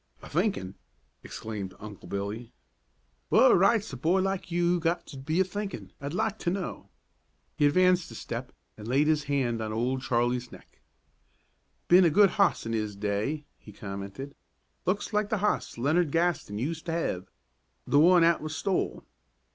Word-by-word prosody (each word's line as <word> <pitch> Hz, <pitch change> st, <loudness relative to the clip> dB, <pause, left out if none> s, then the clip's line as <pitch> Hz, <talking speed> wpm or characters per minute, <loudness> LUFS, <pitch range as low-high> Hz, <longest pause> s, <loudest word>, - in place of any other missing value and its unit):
"A -, -, -10 dB
thinkin'!" 165 Hz, -, -1 dB, 0.5 s
exclaimed 100 Hz, -4 st, -6 dB
Uncle 105 Hz, -2 st, -10 dB
Billy; 100 Hz, +4 st, -4 dB, 0.8 s
"w'at -, -, +7 dB
right's 200 Hz, 0 st, +3 dB
a -, -, -5 dB
boy 165 Hz, +9 st, +2 dB
like 195 Hz, -1 st, -2 dB
you 175 Hz, 0 st, +2 dB
got 170 Hz, +1 st, -1 dB
to 145 Hz, -, -11 dB
be 155 Hz, +6 st, -1 dB
a -, -, +6 dB
thinkin', 190 Hz, -, -6 dB
I'd 145 Hz, +4 st, -4 dB
like 215 Hz, +3 st, -1 dB
to -, -, -1 dB
know?" 185 Hz, 0 st, -4 dB, 0.7 s
He 145 Hz, -, +4 dB
advanced 180 Hz, +3 st, +3 dB
a -, -, -10 dB
step 120 Hz, +2 st, -6 dB, 0.3 s
and 105 Hz, 0 st, -9 dB
laid 135 Hz, +5 st, +3 dB
his 150 Hz, -1 st, +1 dB
hand 130 Hz, -5 st, 0 dB
on 110 Hz, -1 st, -3 dB
Old 125 Hz, +4 st, -1 dB
Charlie's 120 Hz, 0 st, 0 dB
neck. -, -, -16 dB, 1.1 s
"Ben 180 Hz, +2 st, +7 dB
a 170 Hz, -, +5 dB
good 200 Hz, +5 st, +5 dB
hoss 200 Hz, -, +2 dB
in 115 Hz, -, -3 dB
'is 105 Hz, -2 st, -2 dB
day," 105 Hz, +9 st, -2 dB
he 105 Hz, -, -13 dB
commented; 100 Hz, +7 st, -7 dB, 0.5 s
"looks 205 Hz, +4 st, -1 dB
like 210 Hz, 0 st, +1 dB
the 215 Hz, -, +1 dB
hoss 210 Hz, -, -1 dB
Leonard 155 Hz, +7 st, +2 dB
Gaston 165 Hz, -11 st, 0 dB
use 155 Hz, +8 st, -3 dB
to 165 Hz, -, -5 dB
hev, 95 Hz, -, -2 dB, 0.6 s
the 145 Hz, -, +3 dB
one 175 Hz, +2 st, +6 dB
'at 170 Hz, 0 st, +3 dB
was 155 Hz, 0 st, -5 dB
stole." 195 Hz, -2 st, -1 dB
150 Hz, 170 wpm, -28 LUFS, 115-180 Hz, 1.1 s, w'at